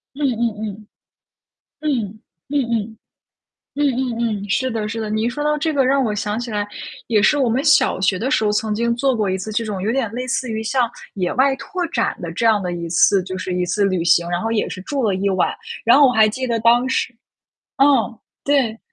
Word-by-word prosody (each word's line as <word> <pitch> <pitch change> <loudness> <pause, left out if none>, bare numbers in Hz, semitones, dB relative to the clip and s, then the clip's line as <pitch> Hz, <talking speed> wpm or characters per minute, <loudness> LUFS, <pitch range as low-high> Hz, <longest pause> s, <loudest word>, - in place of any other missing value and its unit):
嗯 295 - -4
嗯 235 -4 0
嗯， 210 -1 -7 0.9
嗯， 225 -9 -2 0.3
嗯 290 -1 +1
嗯。 220 -1 -2 0.8
嗯 295 - +1
嗯 255 -3 -1 0.3
嗯， 200 - -8
是 260 +4 0
的 215 -2 -2
是 225 +1 -4
的， 215 - -4
你 215 +1 -1
一 - - +1
说 295 +4 -4
到 300 0 +1
这 315 +1 -1
个 270 -2 +2
让 275 +1 +3
我 215 -4 -1
想 210 +1 -2
起 240 -1 -5
来 205 -1 -2 0.4
也 215 -3 +3
是 295 +7 +4
我 260 -4 +2
们 250 +4 +1
小 295 -10 +3
学 190 0 +1
的 255 +7 -2
时 260 - +2
候， 210 - +2
曾 210 0 0
经 235 +2 0
做 265 +1 +1
过 210 -4 0
一 190 - 0
次 215 +3 -6
这 225 +2 -1
种 200 -3 -4
有 215 +3 0
点 250 -4 0
类 250 +1 -3
似 255 0 -2
于 220 0 -3
像 245 0 +1 0.3
野 180 -2 -1
外 270 +1 +3
拓 345 +6 -4
展 235 -8 -1
的 170 -1 -5
这 230 +7 -2
样 215 -3 +3
的 180 - -2
一 170 -1 -4
次 185 +3 +4
就 185 0 -6
是 185 0 -4
一 180 0 0
次 200 +3 0
旅 185 -3 +1
行， 170 0 +3
然 175 - -1
后 225 - -2
也 225 -2 0
是 185 - -7
住 275 +2 -2
了 205 -4 +2
1 195 +1 0
晚， 185 -1 +1 0.3
然 235 +4 +6
后 280 - +7
我 - - +2
还 220 -1 +5
记 255 +3 -4
得 230 -1 0
当 240 +2 +4
时 250 -1 -1 0.7
嗯， 275 - +6 0.6
对 265 -6 +1
225 Hz, 255 characters per minute, -20 LUFS, 205-260 Hz, 0.9 s, 后